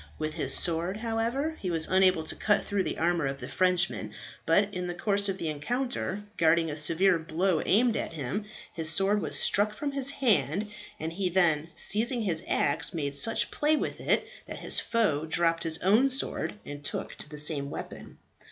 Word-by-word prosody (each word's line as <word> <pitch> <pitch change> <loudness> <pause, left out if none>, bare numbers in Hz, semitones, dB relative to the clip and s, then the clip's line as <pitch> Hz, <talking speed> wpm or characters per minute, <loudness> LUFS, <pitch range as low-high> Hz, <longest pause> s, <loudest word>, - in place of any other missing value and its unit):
With 155 0 -3
his - - +2
sword, 170 +3 +3
however, 235 +7 -2
he 185 - -3
was 165 -2 +3
unable 185 -3 +3
to 160 - -3
cut 210 -2 +1
through 205 -1 0
the 160 - -3
armour 170 -3 +1
of 135 0 -4
the - - -7
Frenchman, 180 0 0 0.3
but 205 0 +3
in 180 0 -3
the 175 - -4
course 200 +2 +1
of 190 - -2
the 165 - -4
encounter, 205 - -3
guarding 165 0 +3
a - - -4
severe 165 +4 +4
blow 165 +2 0
aimed 230 +3 +3
at - - -3
him, 155 - -4 0.3
his 160 -2 -1
sword 195 +5 +2
was - - -2
struck 210 +1 +2
from 285 +5 -3
his 275 -1 0
hand, 210 - 0 0.3
and 160 +1 -4
he 190 +1 -1
then, 165 -4 +2
seizing 230 +3 0
his 170 -5 -1
axe, - - 0
made 140 -3 -3
such 225 +11 +1
play 300 +1 +2
with - - -3
it - - +1 0.2
that - - -7
his - - -1
foe 160 -10 0
dropped 165 +1 +1
his 160 -1 -1
own 220 +9 +4
sword 265 -4 -2
and 145 0 -8
took - - -3
to - - -8
the 150 - -9
same 150 -1 -2
weapon. - - -8
180 Hz, 195 wpm, -28 LUFS, 160-210 Hz, 0.3 s, severe